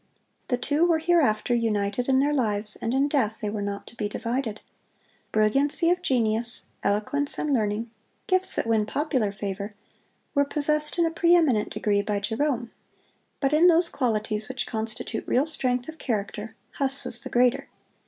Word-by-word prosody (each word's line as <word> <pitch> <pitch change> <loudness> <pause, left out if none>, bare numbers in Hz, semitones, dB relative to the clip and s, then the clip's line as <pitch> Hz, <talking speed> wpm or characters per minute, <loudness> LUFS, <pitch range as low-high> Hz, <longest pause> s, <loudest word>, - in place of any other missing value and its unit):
The 250 - 0
two 290 +6 +1
were 340 -2 +4
hereafter 310 -10 +2
united 225 +1 0
in 265 0 +4
their 290 +1 +1
lives, 210 -5 -1
and 230 - -3
in 270 +3 +2
death 250 -7 0
they 210 -1 -3
were 210 -1 -3
not 200 0 -4
to - - -13
be 210 -3 -3
divided. 230 -1 -3 0.7
Brilliancy 275 +10 +2
of 360 0 0
genius, 235 -5 +1 0.2
eloquence 280 +8 0
and 300 -2 -1
learning—gifts 225 - -2
that - - -1
win 220 -2 +1
popular 260 -8 0
favor—were 205 +8 -5
possessed 300 +2 +1
in 340 - +3
a 330 - 0
preeminent 325 - +3
degree 205 -1 +1
by 205 0 -1
Jerome; 235 +3 -1 0.7
but 275 0 +1
in 320 +4 +6
those 340 0 +5
qualities 215 -4 -1
which 260 0 -3
constitute 220 0 -3
real 265 +4 +2
strength 255 -5 +1
of 320 0 -9
character, 215 -1 -3 0.2
Huss 275 0 0
was 235 - -2
the - - -6
greater. 245 0 +2
240 Hz, 160 wpm, -25 LUFS, 215-290 Hz, 0.7 s, in